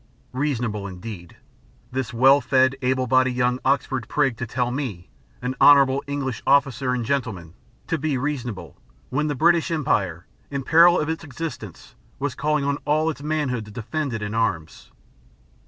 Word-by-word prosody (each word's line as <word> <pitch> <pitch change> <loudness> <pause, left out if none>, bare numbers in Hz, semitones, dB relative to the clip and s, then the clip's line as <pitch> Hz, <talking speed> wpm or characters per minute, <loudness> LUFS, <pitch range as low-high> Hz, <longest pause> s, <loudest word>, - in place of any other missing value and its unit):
Reasonable 120 -7 -2
indeed! 90 -2 -9 0.5
This 130 -2 -3
well 135 +4 +5
fed, 130 0 +3
able 130 0 +1
bodied, 130 0 +2
young 125 0 +1
Oxford 130 -3 0
prig 135 -5 +1
to 125 - -4
tell 125 +1 -1
me, 125 -10 -5 0.3
an 125 +1 -1
honourable 140 -1 +6
English 135 -4 -3
officer 135 -2 +2
and 120 -2 -3
gentleman, 110 - -3 0.3
to 165 - -2
be 145 -2 -1
reasonable, 125 -6 -4 0.4
when 150 +4 0
the 145 - -1
British 170 +3 +3
Empire, 95 - -1 0.2
in 140 -1 -3
peril 170 +4 +6
of 150 - -1
its 160 +1 -3
existence, 155 -2 -7 0.2
was 140 -1 -2
calling 150 -1 0
on 140 0 0
all 155 +2 +1
its 140 - -10
manhood 145 -7 -2
to - - -12
defend 120 +7 -4
it 115 -2 -4
in 105 0 -4
arms! 95 -9 -2
130 Hz, 160 wpm, -23 LUFS, 115-145 Hz, 0.5 s, honourable